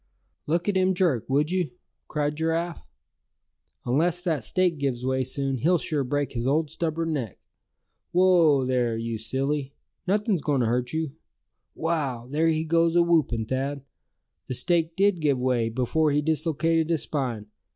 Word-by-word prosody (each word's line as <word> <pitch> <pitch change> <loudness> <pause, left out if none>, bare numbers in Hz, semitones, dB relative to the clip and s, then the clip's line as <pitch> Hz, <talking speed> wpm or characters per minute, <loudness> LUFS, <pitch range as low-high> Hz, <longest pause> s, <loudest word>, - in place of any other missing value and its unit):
"Look 170 +4 0
at 205 - +1
him 185 0 +2
jerk, 160 - +1
would 145 +4 +2
you?" 185 -3 0 0.4
cried 150 -1 -1
Giraffe. 165 +2 -2 1.0
"Unless 165 +8 +1
that 160 -9 -1
stake 180 +3 +1
gives 130 -3 -2
way 130 0 +1
soon, 135 0 -2
he'll 175 +8 +3
sure 150 -3 -1
break 145 +1 -1
his 120 0 -2
old 150 +2 +1
stubborn 165 0 -2
neck. 120 -10 -4 0.7
Whoa! 170 -7 +4
there, 125 -3 0
you 115 -1 -3
silly; 135 +4 -2 0.3
nothing's 205 -2 +1
going 140 -2 +1
to - - +2
hurt 120 +2 0
you. 160 -2 -2 0.6
Wow! 145 -8 -2
there 155 +5 +1
he 160 -1 +1
goes 165 +1 +2
awhoopin', 160 -10 +2
Thad! 135 +2 -2 0.6
The 130 - -3
stake 165 +2 0
did 200 -2 +2
give 145 -3 +2
way, 125 -3 +1
before 130 +6 +1
he 145 +1 +1
dislocated 160 +1 +1
his 165 -3 +2
spine. 125 -8 -3
150 Hz, 155 wpm, -26 LUFS, 130-165 Hz, 1.0 s, Whoa